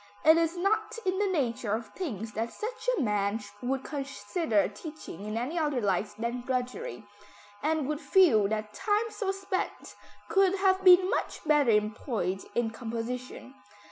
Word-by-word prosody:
It 315 +1 +8
is 330 +1 +1
not 430 +5 0
in 375 +1 +1
the 410 - +2
nature 250 - 0
of 225 -1 -6
things 225 - -4
that 225 +2 -3
such 475 +3 -4
a - - +1
man 210 -2 +1 0.2
would 260 +1 -1
consider 270 - -1
teaching 210 - -9
in 215 +1 -3
any 275 +9 -2
other 295 -5 0
light 205 0 0
than 235 +2 -2
drudgery, 250 -3 -3 0.6
and 310 -1 0
would 300 +1 -2
feel 285 - +5
that 215 0 -3
time 420 +3 0
so 410 -3 -3
spent 390 -1 -4 0.3
could 390 -2 +3
have 380 -1 +2
been 365 0 +8
much - - -2
better 295 -4 +4
employed 210 -3 0
in 235 -2 +1
composition. 245 +3 -5
260 Hz, 155 wpm, -29 LUFS, 220-365 Hz, 0.6 s, It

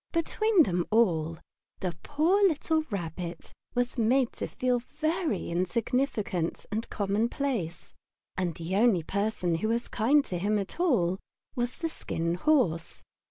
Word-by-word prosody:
Between 375 +3 +3
them 175 -7 0
all 165 -8 +2 0.4
the 180 -3 -2
poor 315 +7 +2
little 320 -1 +1
Rabbit 175 -3 -5 0.2
was 245 +1 0
made 245 +3 +3
to - - -4
feel 250 -1 0
himself 245 - -22
very 315 - 0
insignificant 200 - -1
and 220 +2 -2
commonplace, 210 - -1 0.4
and 180 -3 -1
the 170 +3 -3
only 210 -6 +4
person 200 -1 -1
who 220 - +1
was 235 +2 0
kind 275 +6 +3
to 180 - -3
him 210 +3 +1
at 200 - -4
all 195 - +2 0.4
was 245 0 -1
the 330 - -2
Skin 170 - -2
Horse. 180 - +1
220 Hz, 140 wpm, -29 LUFS, 180-275 Hz, 0.4 s, only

